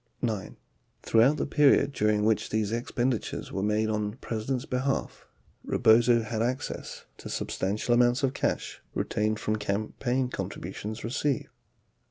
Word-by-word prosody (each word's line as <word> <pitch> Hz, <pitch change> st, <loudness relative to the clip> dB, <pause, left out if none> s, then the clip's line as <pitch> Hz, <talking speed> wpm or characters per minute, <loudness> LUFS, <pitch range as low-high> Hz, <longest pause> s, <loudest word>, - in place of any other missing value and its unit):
9. 110 Hz, -6 st, -2 dB, 0.5 s
Throughout 120 Hz, +7 st, +4 dB
the -, -, -1 dB
period 145 Hz, -1 st, +4 dB
during 105 Hz, -4 st, +1 dB
which 110 Hz, 0 st, +1 dB
these 110 Hz, -1 st, 0 dB
expenditures 120 Hz, +1 st, -2 dB
were 95 Hz, -, -2 dB
made 105 Hz, +2 st, +1 dB
on 105 Hz, -1 st, 0 dB
the 105 Hz, -, -11 dB
President's 120 Hz, +2 st, -3 dB
behalf, 130 Hz, +2 st, -2 dB, 0.4 s
Rebozo 115 Hz, 0 st, +4 dB
had 110 Hz, 0 st, -3 dB
access 125 Hz, +3 st, -3 dB
to -, -, -8 dB
sub -, -, -3 dB
stantial 105 Hz, +5 st, 0 dB
amounts 120 Hz, +3 st, +3 dB
of 135 Hz, -1 st, +2 dB
cash -, -, -2 dB
retained 110 Hz, 0 st, 0 dB
from 110 Hz, -1 st, -1 dB
campaign 110 Hz, +5 st, -1 dB
contributions 110 Hz, -2 st, -5 dB
received. 130 Hz, +3 st, -1 dB
115 Hz, 140 wpm, -28 LUFS, 105-125 Hz, 0.5 s, Throughout